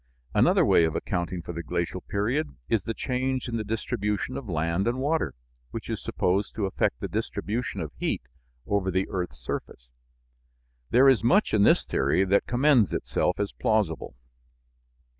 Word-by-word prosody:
Another - - +4
way - - +5
of 80 - -2
accounting 85 0 -2
for 85 - -6
the 85 - -4
glacial 85 +2 -3
period 125 +10 -1
is 110 -4 +1
the 115 - -2
change 130 0 -1
in 115 -1 -2
the 110 - -2
distribution 105 +1 -2
of 125 -7 -6
land 85 +4 0
and 120 +2 0
water, 150 - 0 0.3
which - - -6
is - - -3
supposed 95 +3 0
to 105 - 0
affect 90 -10 0
the - - -3
distribution 115 +4 -3
of - - -5
heat - - -1 0.4
over 100 -2 0
the 95 +1 0
earth's 90 -9 -3
surface. - - -6 1.0
There 130 +3 +6
is 130 -5 +5
much 195 - +3
in 110 - +4
this - - +5
theory 95 - +2
that 100 +1 +2
commends 125 -3 +4
itself 90 - 0
as 100 -1 -1
plausible. 105 - 0
105 Hz, 165 wpm, -27 LUFS, 90-125 Hz, 1.0 s, There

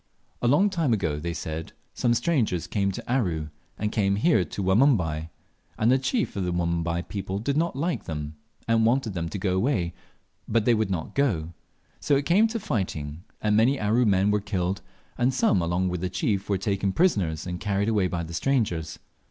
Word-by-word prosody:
A 120 - +1
long 185 +11 +4
time 165 -9 +1
ago, 85 -8 -1
they 85 +3 -3
said, 80 -1 -5 0.2
some 120 -1 +1
strangers 115 - +1
came 100 +2 0
to - - -7
Aru, 90 -12 0 0.3
and 105 0 -2
came 100 -3 +1
here 110 - +3
to 90 +4 -5
Wanumbai, 95 - +2 0.5
and 110 +3 +3
the 130 - +4
chief 220 - -1
of 100 - -1
the 90 - -1
Wanumbai 85 0 -1
people 100 -2 -4
did 135 +7 -1
not 165 -1 0
like 165 +5 -2
them, 75 -1 -5 0.3
and 115 -1 +3
wanted 115 -1 +2
them 85 -2 -3
to 100 - -4
go 95 -1 0
away, 95 -5 0 0.5
but 115 -1 +1
they 120 - +5
would 110 -2 +1
not 85 -4 -3
go, 140 0 +3
and 80 +2 -7 0.5
so 145 - +2
it 140 +1 0
came 200 +8 +4
to 230 +1 -3
fighting, 90 - -3 0.2
and 105 -1 +2
many 125 +6 +3
Aru 110 +3 +2
men 100 0 +3
were 105 0 +1
killed, 95 -2 -2 0.4
and 125 +2 +3
some, 100 -7 +3
along 85 +2 0
with 90 -1 -2
the 90 - -1
chief, 100 +2 -1
were 100 - +2
taken 100 0 -1
prisoners, 95 - +1
and 90 -1 -4
carried 100 0 0
away 105 -4 +2
by 85 -1 -3
the 85 +1 -8
strangers. 90 - 0
100 Hz, 200 wpm, -26 LUFS, 85-120 Hz, 0.5 s, they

